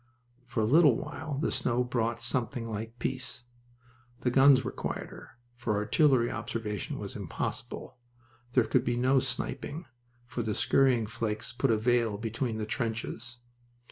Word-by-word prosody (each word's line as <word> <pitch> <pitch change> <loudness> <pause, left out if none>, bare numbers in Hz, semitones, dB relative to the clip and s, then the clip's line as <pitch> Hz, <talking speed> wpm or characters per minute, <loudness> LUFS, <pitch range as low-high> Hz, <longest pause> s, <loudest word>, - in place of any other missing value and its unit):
For 120 -2 -1
a - - +3
little 145 +1 +6
while 155 -3 -5
the 150 - 0
snow 125 -1 +1
brought 115 -1 -1
something 120 -1 -2
like 115 +2 -5
peace. 130 +1 -2 0.8
The 125 - +1
guns 135 0 +7
were - - -3
quieter, - - -6 0.2
for 120 -3 -1
artillery 120 +4 +3
observation 105 -4 -3
was - - -6
impossible. - - -5 0.6
There 125 - +5
could 130 - +2
be 120 -2 0
no 130 +2 +4
sniping, 145 +5 -3 0.4
for 120 0 -4
the 110 -2 -1
scurrying 130 -4 +3
flakes 110 -1 -3
put 135 +2 +1
a 110 - +4
veil 115 -2 +2
between 115 +1 -2
the 110 - -2
trenches. 115 +1 -3
120 Hz, 145 wpm, -30 LUFS, 115-130 Hz, 0.8 s, guns